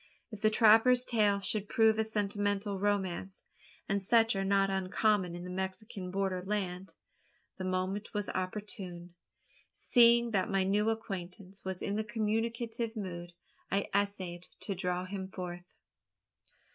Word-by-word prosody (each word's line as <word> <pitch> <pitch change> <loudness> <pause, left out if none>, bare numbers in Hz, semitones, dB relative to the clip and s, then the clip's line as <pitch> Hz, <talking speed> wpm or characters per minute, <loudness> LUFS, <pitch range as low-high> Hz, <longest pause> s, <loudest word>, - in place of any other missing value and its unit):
If 215 -2 -8
the 215 - +5
trapper's 225 +3 +6
tale 210 -4 +2
should 205 0 -1
prove 220 -1 +4
a - - +4
sentimental 205 -1 -1
romance 195 -2 -1 0.4
and 200 0 0
such 225 +2 +4
are 195 - 0
not 195 0 +2
uncommon 190 -1 +1
in 175 - -7
the 180 - -6
Mexican 190 +1 -4
border 190 -1 -1
land 190 -2 -3 0.6
the 185 - -3
moment 185 +3 -2
was 210 -1 -1
opportune. 185 -2 -4 0.6
Seeing 235 -1 +5
that 200 +1 +1
my 195 -1 +2
new 205 +3 +2
acquaintance 195 -3 -5
was 190 -1 -4
in 200 - -1
the 220 - 0
communicative 225 +1 -2
mood, 175 -4 -6 0.4
I 200 +1 0
essayed 190 -3 -1
to 200 - -2
draw 180 -1 -1
him 190 0 -5
forth. 180 -1 -7
200 Hz, 140 wpm, -32 LUFS, 185-215 Hz, 0.6 s, trapper's